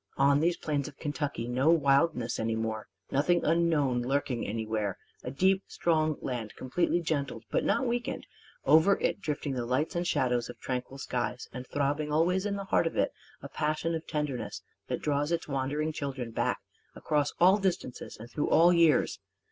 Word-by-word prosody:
On 140 +1 +4
these 170 +2 +2
plains 145 -2 -2
of 145 - -11
Kentucky 145 -5 -3
no 130 +5 +2
wildness 140 -5 +3
any 110 0 0
more, 110 -1 -3 0.2
nothing 170 +6 +2
unknown 155 -6 +2
lurking 130 -1 -1
anywhere: 110 -2 -2 0.3
a - - -4
deep 190 +8 +2
strong 155 -3 +1
land 115 -5 -4
completely 170 +7 0
gentled 140 -8 -2
but - - +1
not 265 - +1
weakened; 240 0 -2 0.4
over 165 +6 +6
it - - 0
drifting 150 -5 -2
the 125 -2 -2
lights 130 +8 -1
and 175 0 0
shadows 125 -5 +1
of 120 - -9
tranquil 130 +1 -4
skies; 125 -2 -3
and 125 +1 -7
throbbing 145 +1 -1
always 180 +6 +2
in 200 - -1
the 200 - -4
heart 170 - +2
of - - -4
it - - +1 0.3
a - - -5
passion 155 +2 -1
of 160 0 -4
tenderness 150 -5 -3 0.2
that - - -3
draws 145 +1 0
its 170 - -1
wandering 145 +3 -1
children 135 -5 -4
back - - -1 0.3
across 145 -1 0
all 185 +4 +6
distances 185 -10 -3
and 115 +2 -10
through 150 - -1
all 175 +2 +6
years. 165 - +3
145 Hz, 175 wpm, -29 LUFS, 125-165 Hz, 0.4 s, over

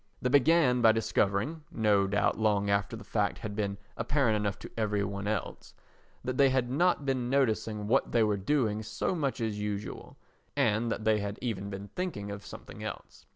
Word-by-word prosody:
They 125 - 0
began 145 -2 +4
by 110 -1 +7
discovering 110 +6 0
(no 105 -3 +3
doubt 100 +1 +1
long 105 -2 +2
after 100 +3 0
the 115 - -9
fact 105 -2 0
had 105 -3 -6
been 100 -2 -2 0.2
apparent 120 -1 +1
enough 105 -2 -1
to - - -10
every 105 -2 0
one 100 0 -4
else) 105 -2 -4 0.5
that 130 0 -3
they 140 -1 +6
had 130 -2 0
not 170 0 +2
been 130 -3 0
noticing 110 -5 +1
what 130 +5 +2
they 115 -2 +4
were 105 -1 +2
doing 110 0 0
so 110 - -2
much 140 -7 -1
as 110 -2 -2
usual, 105 0 -5 0.4
and 110 +2 +2
that 110 - -3
they 110 -1 +3
had 100 0 -3
been - - -14
even 100 -2 -4
thinking 105 - -4
of 100 0 -7
something - - -10
else. - - -8
110 Hz, 190 wpm, -30 LUFS, 100-125 Hz, 0.5 s, by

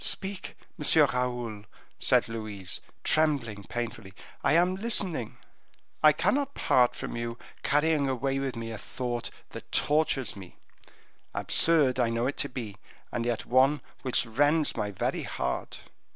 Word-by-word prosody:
"Speak, 195 -1 -1 0.2
Monsieur 150 0 +5
Raoul," 120 -5 -3 0.3
said - - +3
Louise, 110 -4 -3 0.2
trembling 140 -10 +1
painfully, 115 -1 -5 0.3
"I - - +3
am 175 +3 +4
listening." 190 - 0 0.6
"I 155 - +8
cannot 280 - 0
part 125 -1 +3
from - - -5
you, 115 0 -4 0.2
carrying 145 -1 +2
away 135 +1 -1
with 135 -2 -3
me 115 0 -5
a 110 - -6
thought 120 -2 -4 0.2
that - - -10
tortures 145 -5 +1
me; 95 -3 -11 0.8
absurd 145 -6 +4
I 120 -2 +3
know 115 +1 0
it 140 - -2
to 140 - -1
be, 115 -6 -6 0.3
and 120 -1 -2
yet 120 -2 -2
one 135 +4 +4 0.2
which 130 -1 +2
rends 145 +7 +2
my 105 -2 -2
very 100 - -2
heart." - - -4
125 Hz, 140 wpm, -28 LUFS, 115-150 Hz, 0.8 s, I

